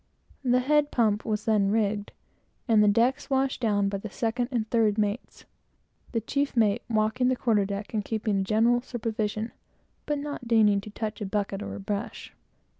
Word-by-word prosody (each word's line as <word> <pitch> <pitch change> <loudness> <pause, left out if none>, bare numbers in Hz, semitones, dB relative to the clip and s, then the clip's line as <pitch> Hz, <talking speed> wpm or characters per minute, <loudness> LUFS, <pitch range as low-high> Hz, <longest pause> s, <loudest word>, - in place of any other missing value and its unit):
The 250 0 +3
head 295 +2 +2
pump 215 -5 +1
was 215 0 -2
then 210 -3 +3
rigged, 210 -1 0 0.6
and 220 -3 +5
the - - +4
decks 240 +7 +2
washed 270 -1 0
down 205 -3 +2
by 200 0 -2
the 215 - -7
second 235 +4 -1
and 235 -5 -1
third 220 -2 +2
mates; 210 +2 -2 0.7
the 230 - -1
chief 280 +3 -2
mate 215 0 +3
walking 220 +3 +1
the 255 - +2
quarter 220 -5 +2
deck 200 +2 -5
and 215 -2 0
keeping 215 -2 -1
a - - +1
general 225 +4 +3
supervision, 220 -2 -3 0.6
but 295 -1 0
not 285 -4 -6
deigning 210 -3 +4
to 215 - -10
touch 215 0 -5
a - - -2
bucket 200 0 -2
or - - -5
a - - -7
brush. 200 +2 -5
220 Hz, 185 wpm, -27 LUFS, 205-240 Hz, 0.7 s, and